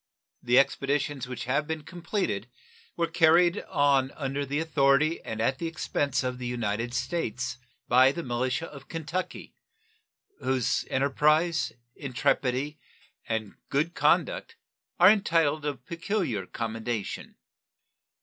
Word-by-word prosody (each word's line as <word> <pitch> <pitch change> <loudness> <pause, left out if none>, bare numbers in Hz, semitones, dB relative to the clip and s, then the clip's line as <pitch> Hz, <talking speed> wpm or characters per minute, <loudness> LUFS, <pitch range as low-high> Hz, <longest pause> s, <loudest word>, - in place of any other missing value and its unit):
The 125 +1 +3
expeditions 140 0 +1
which 125 -1 -5
have 140 +4 0
been 160 -1 -3
completed 175 - -3 0.5
were 170 - +2
carried 170 +3 +4
on 140 -2 +3
under 140 0 -3
the 140 +2 -1
authority 150 0 +2
and 110 - -6
at 130 +4 +1
the 170 - -2
expense 140 -4 -1
of 125 0 -3
the 125 - -4
United 120 0 -2
States 130 - -2 0.3
by 130 +2 +6
the 170 +4 -5
militia 125 +4 -1
of 140 -4 -12
Kentucky, 165 +3 -5 0.9
whose 130 -3 0
enterprise, 150 +5 +2 0.2
intrepidity, 135 +2 -1 0.5
and 110 -2 -2 0.2
good 155 +5 0
conduct - - +1 0.4
are 180 +3 +9
entitled 165 -7 +2
of 145 -2 -5
peculiar 170 - -2
commendation. 115 -2 -4
140 Hz, 120 wpm, -28 LUFS, 125-165 Hz, 0.9 s, are